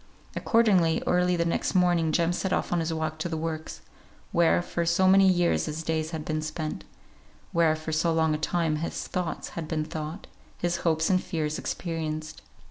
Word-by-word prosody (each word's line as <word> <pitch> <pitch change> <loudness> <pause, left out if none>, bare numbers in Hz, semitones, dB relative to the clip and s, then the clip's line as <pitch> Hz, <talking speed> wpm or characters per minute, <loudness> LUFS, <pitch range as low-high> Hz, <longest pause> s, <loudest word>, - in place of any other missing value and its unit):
Accordingly, 190 -8 +3
early 180 0 +2
the 170 -1 0
next 170 - -1
morning 175 -3 +3
Jem 170 +1 +2
set 190 +2 -2
off - - 0
on 175 - +2
his 165 0 -1
walk 155 -1 -3
to 175 - -2
the 160 - -2
works, 160 0 -5 0.5
where 170 +1 +3
for 170 - -2
so 170 +3 +3
many 195 +1 +6
years 175 -1 +2
his 155 +1 -4
days 160 -1 -1
had 160 -2 -5
been 155 0 -1
spent; 155 0 -4 0.7
where 165 -2 +3
for 155 0 -6
so 160 +2 +1
long 160 -1 +2
a 150 - -2
time 160 -1 0
his 165 +2 -4
thoughts 180 -2 -3
had 165 -2 -6
been 155 -1 -1
thought, 155 +3 -6 0.3
his 175 0 -1
hopes 160 0 +1
and 185 -1 +3
fears 155 -2 -2
experienced. 155 -2 -4
165 Hz, 190 wpm, -27 LUFS, 155-175 Hz, 0.7 s, many